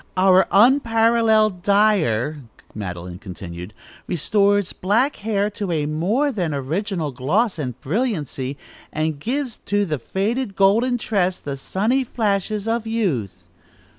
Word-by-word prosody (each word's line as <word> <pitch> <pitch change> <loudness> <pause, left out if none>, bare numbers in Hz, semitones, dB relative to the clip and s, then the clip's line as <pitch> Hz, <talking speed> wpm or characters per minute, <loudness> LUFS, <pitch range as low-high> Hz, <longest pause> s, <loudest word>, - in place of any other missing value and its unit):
"Our 185 0 +5
unparalleled 225 -3 +4
dyer," 175 - +2 0.3
Madeline 90 -3 -6
continued, 90 -1 -8 0.4
"restores 200 +3 +1
black 230 +10 +1
hair 210 -1 -1
to 200 -2 -4
a 155 -3 0
more 195 - 0
than 175 - -2
original 160 +3 -2
gloss 170 - 0
and 125 -4 -4
brilliancy, 145 - -2 0.3
and 155 -1 -2
gives 255 - -3
to 205 0 -1
the 155 -6 -2
faded 205 - -2
golden 230 +6 +3
tress 190 -5 0
the 140 -1 -5
sunny 215 - 0
flashes 210 -3 -1
of 225 0 -1
youth." 125 - -2
195 Hz, 120 wpm, -21 LUFS, 150-220 Hz, 0.4 s, Our